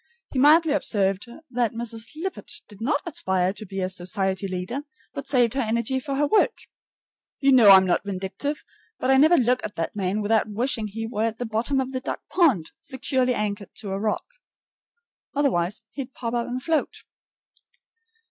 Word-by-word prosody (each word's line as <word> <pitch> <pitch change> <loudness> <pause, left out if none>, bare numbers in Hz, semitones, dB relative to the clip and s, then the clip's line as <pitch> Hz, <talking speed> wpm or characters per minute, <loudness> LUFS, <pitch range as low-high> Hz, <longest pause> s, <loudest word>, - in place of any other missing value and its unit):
He 265 - -1
mildly 310 +3 +6
observed 200 -7 0 0.2
that 240 -3 0
Mrs. 230 -1 -2
Lippett 375 +5 -5 0.2
did 205 0 -15
not 285 +5 0
aspire 190 - 0
to 215 0 -9
be 195 0 -4
a 185 - 0
society 190 +1 -2
leader, 185 +8 -4 0.3
but 280 - -6
saved 245 -4 +3
her 270 - 0
energy 235 +3 0
for 275 +1 -4
her 290 +2 +2
work. 415 +8 +3 0.8
You 275 0 +4
know 240 -6 +7
I'm 190 -1 +9
not 180 - +1
vindictive, 200 +9 -4 0.3
but 260 - +1
I 265 - +6
never 315 +5 +6
look 250 0 +2
at 215 - -5
that 165 +4 -3
man 200 +1 -1
without 220 +1 +2
wishing 225 +1 -1
he 225 +2 -5
were 225 -1 -1
at 225 -1 -4
the 245 - -3
bottom 230 +5 0
of 260 0 -2
the 255 -1 -3
duck - - -4
pond, 265 - +2
securely 260 -2 0
anchored 205 -1 -4
to 200 - -5
a 195 - -2
rock. 215 0 -1 1.1
Otherwise 210 -9 +1
he'd 265 -2 -7
pop 230 -1 -4
up 235 -1 -1
and 255 +1 -4
float. 320 -2 -1
230 Hz, 180 wpm, -24 LUFS, 200-265 Hz, 1.1 s, I'm